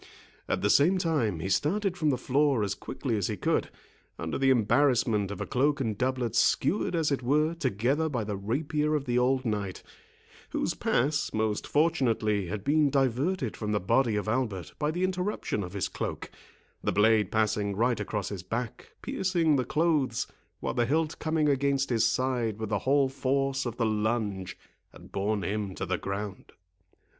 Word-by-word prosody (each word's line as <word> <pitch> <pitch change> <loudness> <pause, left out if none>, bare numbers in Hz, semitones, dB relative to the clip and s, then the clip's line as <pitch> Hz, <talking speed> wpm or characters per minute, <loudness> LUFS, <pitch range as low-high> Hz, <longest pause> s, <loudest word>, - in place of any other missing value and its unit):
At - - -1
the 105 - +3
same 175 +7 +5
time, 135 - 0
he 95 - -3
started 190 - +1
from 155 -4 +1
the 130 - +1
floor 135 -2 +2
as 100 -1 -1
quickly 120 +3 -4
as 100 - 0
he 105 - -3
could, - - 0 0.5
under 80 +5 -3
the 135 -1 +3
embarrassment 120 -3 +3
of 100 -3 -6
a - - -2
cloak 140 +3 +1
and 115 -5 -1
doublet 125 -1 -1
skewered 180 - +2
as 160 -3 +1
it 140 - 0
were 150 +6 +2
together 135 - 0
by 125 -6 -2
the 105 -1 -3
rapier 150 +9 -1
of 145 -2 -1
the 125 -1 +1
old 130 +1 +1
knight, 105 -4 -3 0.7
whose - - -1
pass, 145 +4 0
most 110 -1 -1
fortunately, 115 - +1
had 100 +2 -4
been 150 +2 +3
diverted 135 - 0
from 105 0 -3
the 105 - +2
body 115 +4 +2
of 105 0 -2
Albert 110 -6 -2
by 150 - +1
the 175 +4 -1
interruption 185 - -1
of 90 -1 -6
his 100 - -1
cloak, - - -5 0.5
the - - +1
blade 105 -2 +3
passing 105 -2 +1
right 120 +2 +1
across 105 -1 -3
his 100 -3 -5
back, 115 +6 -5
piercing 170 -5 +1
the 130 -2 +1
clothes, 150 -5 +1 0.4
while - - -2
the 120 -1 +1
hilt 155 +3 0
coming 155 -1 +1
against 140 -1 +1
his 115 -1 +3
side 120 -5 0
with 110 -1 -4
the 105 -2 0
whole 140 -1 +4
force 135 0 -1
of 120 - -5
the 115 - +1
lunge, 105 -3 -1 0.4
had - - -14
borne 100 0 -1
him 100 0 -3
to - - -3
the 95 -2 -1
ground. 100 0 -5
125 Hz, 180 wpm, -28 LUFS, 105-145 Hz, 0.7 s, same